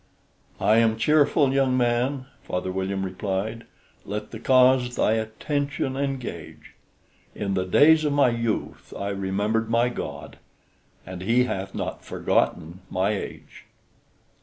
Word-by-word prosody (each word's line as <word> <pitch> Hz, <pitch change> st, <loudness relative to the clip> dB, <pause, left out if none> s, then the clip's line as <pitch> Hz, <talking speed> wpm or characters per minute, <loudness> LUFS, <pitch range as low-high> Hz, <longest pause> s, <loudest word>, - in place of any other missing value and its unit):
"I 110 Hz, -, +4 dB
am 115 Hz, -1 st, +3 dB
cheerful, 145 Hz, +2 st, +3 dB
young 135 Hz, -2 st, +2 dB
man," 125 Hz, +2 st, 0 dB, 0.2 s
Father 90 Hz, +1 st, -3 dB
William 95 Hz, +1 st, -2 dB
replied; 95 Hz, +4 st, -3 dB, 0.4 s
"Let 105 Hz, +1 st, -5 dB
the 110 Hz, -, -7 dB
cause 125 Hz, -1 st, +4 dB
thy -, -, +2 dB
attention 130 Hz, +5 st, -2 dB
engage: 135 Hz, -2 st, -5 dB, 0.6 s
In 100 Hz, -1 st, -2 dB
the 95 Hz, -1 st, 0 dB
days 155 Hz, -, +5 dB
of 150 Hz, -, +1 dB
my 140 Hz, -3 st, +4 dB
youth 115 Hz, -2 st, -3 dB
I 100 Hz, -, -3 dB
remembered 100 Hz, +3 st, -1 dB
my 120 Hz, +1 st, +2 dB
God; 120 Hz, -, -7 dB, 0.7 s
And 90 Hz, 0 st, -8 dB
he 115 Hz, +6 st, +3 dB
hath 95 Hz, -5 st, -4 dB
not -, -, -4 dB
forgotten 85 Hz, +3 st, -1 dB
my 95 Hz, +3 st, 0 dB
age." 105 Hz, -, -7 dB
115 Hz, 130 wpm, -24 LUFS, 100-130 Hz, 0.7 s, days